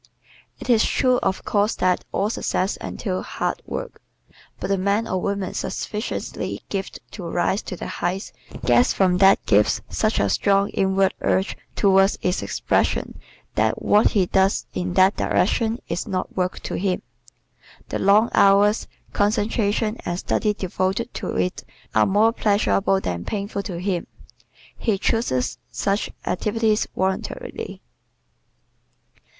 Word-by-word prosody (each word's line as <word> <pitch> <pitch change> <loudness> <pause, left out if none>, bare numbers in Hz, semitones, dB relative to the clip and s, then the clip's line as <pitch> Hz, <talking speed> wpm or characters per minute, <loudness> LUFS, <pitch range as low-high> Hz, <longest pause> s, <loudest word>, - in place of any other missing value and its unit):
It - - -8
is 235 -3 +4
true 255 -1 +2
of 190 0 -2
course 205 +1 +1
that 180 0 +1
all 205 +2 0
success 190 -3 -1
entails 185 -4 -4
hard - - -3
work. - - -6 0.6
But - - -4
the 195 - +2
man 200 +4 +1
or 185 -3 -1
woman 200 -1 -2
sufficiently 210 +1 -4
gifted 195 -1 -4
to 175 -5 -6
rise 180 +4 0
to - - -6
the - - -7
heights 185 +3 -3 0.3
gets 245 - +4
from 180 -2 +2
that 195 0 +5
gift 105 0 +3
such - - +1
a 100 - +2
strong 200 - +2
inward 190 0 +2
urge 190 +2 +1 0.2
towards 195 0 +4
its 180 +1 0
expression - - -1 0.3
that - - +1
what 210 +1 +5
he 195 -4 +3
does 190 +2 +2
in 180 0 -3
that 190 +1 +5
direction 225 +4 +1
is 170 - -3
not 185 -1 -3
work 185 -1 -1
to - - -4
him. 185 -1 -1 0.9
The - - -2
long 210 +4 +4
hours, 200 +2 +4 0.3
concentration 215 +1 +1
and 175 0 -2
study 210 +2 0
devoted 190 +4 -2
to - - -4
it 180 - -1 0.3
are - - +4
more 215 +4 +3
pleasurable 200 -2 +2
than 85 - -3
painful 200 -1 -3
to 185 -4 -5
him. 180 -1 -2 0.7
He 220 -4 0
chooses 190 - 0
such 200 +1 -1 0.2
activities 220 0 +1
voluntarily. 190 0 -3
195 Hz, 140 wpm, -23 LUFS, 185-210 Hz, 0.9 s, that